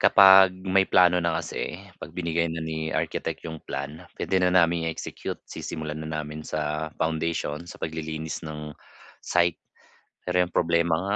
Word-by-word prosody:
Kapag 95 -1 +8
may 95 0 +3
plano 90 -1 +5
na 85 -1 0
kasi, 85 - -4 0.2
'pag - - -10
binigay 85 -1 0
na 80 - -4
ni 80 0 -3
architect - - -2
yung 80 -1 -6
plan, 75 +6 -5 0.2
pwede 95 - +1
na 90 0 +3
naming 85 -2 +4
i-execute. 80 - -5
Sisimulan 75 -1 -5
na 80 0 -3
namin 75 +1 -8
sa 75 0 -2
foundation' 80 -1 -1
sa 85 - -11
paglilinis 80 0 -4
ng 75 -1 -7 0.5
site. 85 -1 +2 0.7
Pero 90 0 0
yung 90 - +3
problema 85 -1 +3
nga, 100 +5 -1
80 Hz, 155 wpm, -26 LUFS, 80-90 Hz, 0.7 s, Kapag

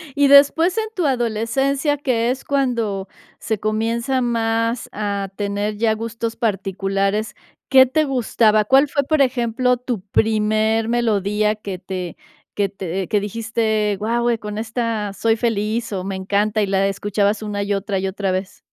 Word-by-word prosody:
Y 285 0 +4
después, 290 +7 +5
en 440 - +1
tu 360 -5 0
adolescencia, 270 +4 0
que 245 -4 0
es 265 - -5
cuando 235 -8 -1 0.3
se 220 -2 -2
comienza 230 +4 -1
más 230 0 0
a 200 -2 -3
tener 205 +1 -2
ya 220 0 +2
gustos 230 +1 -4
particulares, 195 -1 -1 0.3
¿qué 260 -1 +8
te 295 +5 +1
gustaba? 225 -5 +2
¿Cuál 270 +5 +5
fue, 280 0 0
por 310 +1 +1
ejemplo, 250 -1 +1
tu 245 -4 -4
primer 215 +2 +1
melodía 210 -2 +1
que 200 -3 -7
te 185 -2 -6 0.4
que 200 -1 +1
te 190 -1 -4
que 210 - +1
dijiste: 220 0 -1
"Guau, 235 +3 0
eh, 230 -1 0
con 210 0 -6
esta 225 -2 -2
soy 225 +2 +1
feliz", 225 0 -1
o 185 - -3
"me 195 0 -4
encanta", 205 +3 0
y 205 - +1
la 195 0 +2
escuchabas 205 +1 0
una, 205 -1 -3
y 200 0 -1
otra, 195 -1 -2
y 195 - -2
otra 190 0 -2
vez? 185 +1 -4
220 Hz, 160 wpm, -20 LUFS, 200-240 Hz, 0.4 s, qué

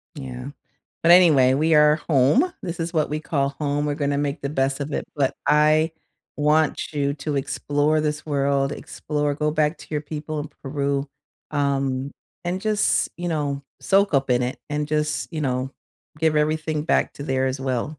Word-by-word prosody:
Yeah. 130 -2 -7 0.6
But 170 - +6
anyway, 150 -8 +6
we 155 +3 +2
are 150 0 +6
home. 165 - +4
This 175 -2 -5
is 165 +1 -3
what 155 -2 +1
we 150 +1 -2
call 140 -4 0
home, 145 0 0
we're 145 -1 -1
gonna 140 -1 0
make 145 +2 -2
the 140 - -2
best 135 -1 0
of 140 +2 -4
it, - - -2
but 140 -2 0
I 155 +2 +4 0.4
want 150 +1 +1
you 140 -1 0
to 150 0 -3
explore 145 +2 0
this 150 0 -2
world, 140 -1 +1
explore, 150 0 -3
go 150 +1 0
back 155 +1 +1
to - - -12
your 150 -1 -2
people 155 0 -5
in 150 +1 -5
Peru. 140 0 -1 0.4
Um, 140 -2 0 0.3
and 180 +2 -2
just, 215 -1 +1
you 175 0 -3
know, 145 -3 -2 0.2
soak 195 -3 +2
up 135 -1 +2
in 125 0 +3
it 125 - -3
and 150 0 -2
just, 150 +1 -1
you 155 -2 -3
know, 130 0 -1 0.5
give 160 -1 +2
everything 155 0 0
back - - +1
to 140 - -8
there 130 -2 0
as 130 +1 -3
well. 130 -3 -1
150 Hz, 185 wpm, -23 LUFS, 140-155 Hz, 0.6 s, But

